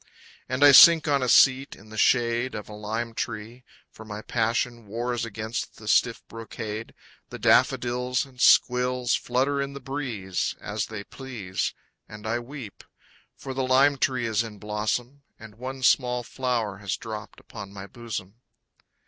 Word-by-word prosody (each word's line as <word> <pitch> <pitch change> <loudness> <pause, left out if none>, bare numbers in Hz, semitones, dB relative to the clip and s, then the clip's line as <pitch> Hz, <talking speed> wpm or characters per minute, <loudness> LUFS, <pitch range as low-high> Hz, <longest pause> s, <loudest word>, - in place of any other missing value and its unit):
And 130 +3 0
I 145 - +9
sink 160 +3 +9
on 140 -2 +2
a 125 - 0
seat 135 +3 +5
in 105 +2 -17
the - - -9
shade 120 +2 +2
Of 105 - -6
a 105 - -10
lime 110 +3 -4
tree. 115 +2 -5 0.3
For 110 - -12
my 105 0 -8
passion 115 0 -1
Wars 120 +2 -2
against 110 +1 -5
the 105 - -12
stiff 115 +2 +2
brocade. 110 -1 -7 0.3
The - - -7
daffodils 125 +1 +2
and 130 -2 -12
squills 125 0 +4
Flutter 135 +3 0
in 140 0 -4
the 140 - -7
breeze 125 -9 -3
As - - -3
they 110 -2 -7
please. 115 -8 -5 0.3
And 105 0 -11
I 115 +2 -1
weep; 120 -4 -10 0.5
For 135 - -6
the 135 - -2
lime 135 +2 +4
tree 130 -4 0
is 110 -1 +1
in 110 -3 -7
blossom 110 +6 -3 0.2
And 110 -1 -12
one 130 +1 -6
small 125 -1 +3
flower 120 -6 -2
has 100 -1 -3
dropped 110 -2 -8
upon 100 - -10
my 100 -1 -8
bosom. 110 -1 -8
120 Hz, 160 wpm, -26 LUFS, 110-130 Hz, 0.5 s, I